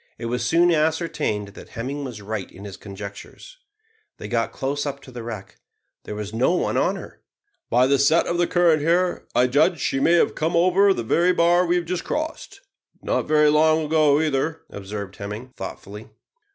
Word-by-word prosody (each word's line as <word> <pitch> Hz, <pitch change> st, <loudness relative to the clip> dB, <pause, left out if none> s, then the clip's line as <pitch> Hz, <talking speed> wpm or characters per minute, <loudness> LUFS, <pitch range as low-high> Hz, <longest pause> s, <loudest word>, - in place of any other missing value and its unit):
It 115 Hz, -, -7 dB
was 120 Hz, +1 st, -2 dB
soon 170 Hz, +6 st, +3 dB
ascertained 155 Hz, -, 0 dB
that 100 Hz, -, -13 dB
Hemming 135 Hz, +5 st, -5 dB
was 120 Hz, -6 st, -7 dB
right 105 Hz, -1 st, -5 dB
in 100 Hz, +3 st, -12 dB
his 100 Hz, -3 st, -8 dB
conjectures. 100 Hz, -, -10 dB, 0.6 s
They -, -, -7 dB
got 115 Hz, -1 st, -1 dB
close 145 Hz, +2 st, -3 dB
up 140 Hz, -1 st, -4 dB
to 130 Hz, -, -13 dB
the 120 Hz, -1 st, -7 dB
wreck. 110 Hz, -4 st, -8 dB, 0.5 s
There 105 Hz, -, -6 dB
was 105 Hz, 0 st, -6 dB
no 130 Hz, +10 st, +2 dB
one -, -, -1 dB
on -, -, +1 dB
her! -, -, -11 dB, 0.5 s
"By 125 Hz, +1 st, +4 dB
the 140 Hz, +1 st, +2 dB
set 155 Hz, +5 st, +4 dB
of 175 Hz, -, -2 dB
the 175 Hz, -, +2 dB
current 170 Hz, -4 st, +3 dB
here, 175 Hz, +3 st, +1 dB
I 125 Hz, -, +5 dB
judge 145 Hz, +5 st, +3 dB
that -, -, -15 dB
she 135 Hz, -, -1 dB
may 165 Hz, +5 st, +3 dB
have 175 Hz, -, +3 dB
come 160 Hz, +2 st, -1 dB
over 185 Hz, +4 st, +4 dB
the 155 Hz, -, -1 dB
very 175 Hz, +10 st, +2 dB
bar 175 Hz, +1 st, +3 dB
we 175 Hz, -, +2 dB
have 175 Hz, -1 st, 0 dB
just 180 Hz, +1 st, -3 dB
crossed 315 Hz, +6 st, -5 dB, 0.4 s
not -, -, -1 dB
very 150 Hz, 0 st, +4 dB
long 155 Hz, +1 st, +3 dB
ago 150 Hz, -2 st, +3 dB
either," 155 Hz, +1 st, -1 dB
observed 100 Hz, -1 st, -7 dB
Hemming, 105 Hz, +5 st, -7 dB
thoughtfully. 105 Hz, +3 st, -8 dB
145 Hz, 195 wpm, -23 LUFS, 115-170 Hz, 0.6 s, I